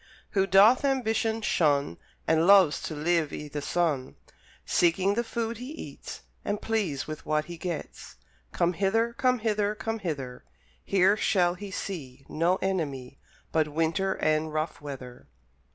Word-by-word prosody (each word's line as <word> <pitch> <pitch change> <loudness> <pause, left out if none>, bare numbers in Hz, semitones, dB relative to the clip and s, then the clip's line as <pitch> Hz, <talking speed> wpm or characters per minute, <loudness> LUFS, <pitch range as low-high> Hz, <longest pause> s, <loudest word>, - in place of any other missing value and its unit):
Who 195 -1 +2
doth 200 +8 +6
ambition 225 -4 0
shun 145 - +1 0.3
And 160 +1 +3
loves 190 -7 +6
to 155 - -5
live 160 0 +1
i' 150 - -6
the 145 0 -4
sun; 145 -3 -1 0.5
Seeking 185 +3 +2
the 235 +3 0
food 230 0 -3
he 255 +5 -7
eats, 315 - -9 0.2
And 205 0 -2
pleased 195 -11 -1
with 155 -1 -7
what 155 0 0
he 175 - -8
gets, 170 -1 -6 0.4
Come 170 +1 +1
hither, 225 +6 +1
come 255 +1 +2
hither, 210 -2 0
come 225 +1 -3
hither; 140 -9 -5 0.4
Here 195 +1 +3
shall 180 -4 +2
he 200 +2 -8
see 140 -9 -6
No 170 +4 +1
enemy 140 -9 -3 0.3
But 155 -1 +2
winter 165 +5 0
and 155 0 0
rough 155 0 -3
weather. 130 -4 -9
175 Hz, 150 wpm, -27 LUFS, 155-210 Hz, 0.5 s, doth